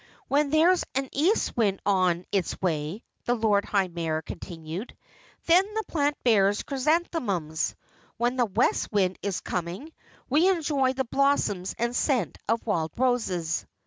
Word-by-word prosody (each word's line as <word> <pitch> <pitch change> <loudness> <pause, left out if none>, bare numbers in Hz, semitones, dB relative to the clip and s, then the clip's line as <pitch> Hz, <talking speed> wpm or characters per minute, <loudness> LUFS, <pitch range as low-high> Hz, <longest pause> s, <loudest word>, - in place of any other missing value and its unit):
When 285 +1 +2
there's 335 +4 +4
an 270 0 -1
east 340 +11 +1
wind 205 -5 +1
on 185 -3 +2
its 195 -4 -1
way," 165 +3 -2 0.2
the 245 - +2
Lord 215 -3 +2
High 195 -2 +1
Mayor 165 -2 -3
continued, 165 +6 -7 0.5
"then 350 +3 +6
the 440 - 0
plant 290 -2 0
bears 205 -4 +3
chrysanthemums. 260 - -1 0.4
When 240 +2 +1
the 250 -2 +2
west 190 - +1
wind 190 -3 +1
is 200 -3 -2
coming, 180 - -4 0.3
we 315 +8 +4
enjoy 290 -7 +1
the 265 0 -1
blossoms 230 -9 +1
and 235 +1 -1
scent 245 - 0
of 230 0 0
wild 165 -8 -1
roses." 220 -10 0
225 Hz, 145 wpm, -26 LUFS, 180-280 Hz, 0.5 s, then